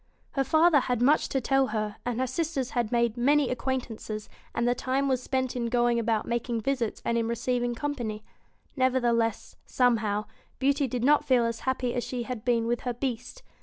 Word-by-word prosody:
Her 275 - +1
father 315 +2 +5
had 250 -2 -1
much 280 +6 +3
to 270 - 0
tell 270 +1 +2
her, 215 -3 -3
and 245 -1 -2
her 260 - +2
sisters 280 -2 -2
had 240 -3 -1
made 235 -1 +1
many 280 +2 +3
acquaintances, 230 -4 -4 0.3
and 235 - +1
the 245 - +4
time 265 +2 -1
was 260 -2 +1
spent 260 -1 -1
in 240 -1 -1
going 240 0 +2
about 225 -2 0
making 235 -1 -1
visits 245 -2 -2
and 235 0 +1
in 225 - -1
receiv 240 +1 -1
ing 240 0 -1
company. 235 -6 -3 0.5
Nevertheless, 240 -4 +1
somehow, 215 -4 +1 0.3
Beauty 280 +1 +2
did 245 -1 -3
not 295 +3 +4
feel 250 -3 +3
as 230 -1 -2
happy 250 -2 -1
as 245 - -1
she 245 -2 -3
had 235 -2 -6
been 235 -2 +2
with 240 0 0
her 245 -2 -3
Beast. 250 - -4
245 Hz, 195 wpm, -27 LUFS, 235-265 Hz, 0.5 s, father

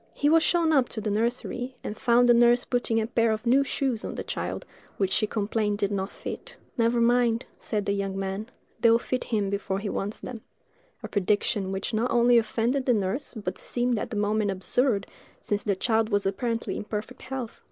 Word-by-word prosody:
He 290 - +2
was 325 +1 +6
shown 330 -1 +3
up 265 -4 +3
to 225 - -4
the 210 -1 -2
nursery, 245 +3 -2
and 210 - -4
found 245 0 +4
the 240 - +7
nurse 240 +1 +5
putting 240 -2 0
a 220 - 0
pair 230 -1 +2
of 220 +2 -3
new 260 +4 +4
shoes 260 -4 -1
on - - -5
the - - -4
child, - - -4 0.3
which 195 -2 0
she 215 +2 +2
complained 210 0 -1
did 200 0 0
not 195 -1 -2
fit. - - -8 0.2
"Never 235 0 +2
mind," 235 0 +3
said 210 -3 -2
the - - 0
young 195 -1 -2
man, 195 +4 -3 0.3
"they 230 - +5
will 230 - +6
fit 250 +2 -3
him 205 -4 -1
before 200 -1 -2
he 200 +1 -3
wants 200 +2 -3
them"—a 230 -4 -12
prediction 205 -1 0
which 195 +4 -3
not 225 +3 +1
only 240 0 +5
offended 235 +4 -1
the 250 - +5
nurse, 210 +8 -2
but 190 -4 -4
seemed 240 -2 0
at - - -4
the 230 - -5
moment 210 0 +1
absurd, 200 +3 +1 0.3
since 205 -1 -2
the 200 - +1
child 220 +2 +1
was 205 -2 +1
apparently 230 +4 -1
in - - -4
perfect 215 +4 -6
health. 255 -4 -6
225 Hz, 205 wpm, -26 LUFS, 205-245 Hz, 0.3 s, the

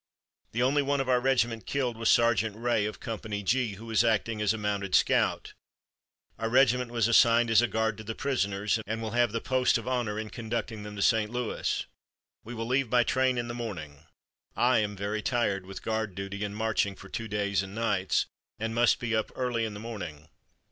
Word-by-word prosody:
The 120 +2 +1
only 140 +3 +3
one 140 0 0
of 135 - -1
our 125 -1 +3
regiment 120 -3 +1
killed 130 -4 -1
was 115 0 0
Sergeant 110 -3 +3
Ray, 115 -2 +1
of 105 - -7
Company 110 -2 -5
G, 115 +1 +1
who 110 +4 -11
was 115 -1 +2
acting 115 -1 +1
as 105 -2 +3
a 110 - -2
mounted 100 -2 -1
scout. - - +2 0.9
Our 115 0 -1
regiment 125 0 +3
was 115 -2 +1
assigned 115 0 +5
as 110 0 +6
a 120 - +2
guard 110 -2 -1
to - - -7
the 110 +1 -5
prisoners, 105 -6 0
and 115 +2 -2
will 110 -1 -4
have 120 -1 +2
the 115 - -1
post 130 +1 +2
of 115 - -7
honor 120 -5 -1
in 110 -1 -5
conducting 115 -1 -4
them 105 0 -8
to 100 - -1
St. 110 -3 +3
Louis. 125 -2 -2 0.6
We 120 +2 -8
will 115 0 -3
leave 130 +1 +1
by 120 0 +4
train 130 +1 +1
in 120 0 -2
the 120 - -4
morning. 80 -11 -7 0.5
I 125 -1 +3
am 105 -1 -1
very 100 +2 -3
tired 100 -6 0
with 95 - -8
guard 110 -4 -2
duty 100 +1 -5
and 100 0 -4
marching 110 -2 0
for 100 - -12
two 115 +3 -5
days 100 -2 0
and 95 +1 -8
nights, 105 -5 +1 0.3
and 110 +1 -3
must 120 +1 +4
be 115 -1 -1
up 110 - -1
early 120 -3 -1
in 105 -2 -5
the - - -7
morning." 90 -10 -7
115 Hz, 210 wpm, -28 LUFS, 105-120 Hz, 0.9 s, as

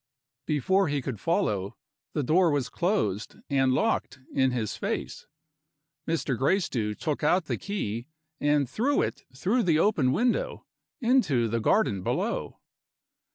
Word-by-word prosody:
Before 190 +6 +2
he 145 -1 0
could 125 -5 -5
follow, 105 - 0 0.4
the 150 - 0
door 170 +6 +4
was 145 -4 0
closed 170 - -1 0.2
and 135 -2 +3
locked 135 - 0
in 130 -1 +3
his 120 -4 -2
face. - - -4 0.8
Mr. 160 -5 0
Gracedieu 125 - 0
took 150 +4 -3
out 175 +3 +3
the - - -1
key 120 - -4 0.3
and 145 -2 +2
threw 255 - +1
it - - -4
through 220 - +2
the 170 -7 +3
open 160 -8 +3
window, 250 - 0 0.4
into 230 - +3
the 115 +1 -1
garden 110 - +2
below. - - -2
145 Hz, 135 wpm, -27 LUFS, 125-195 Hz, 0.8 s, door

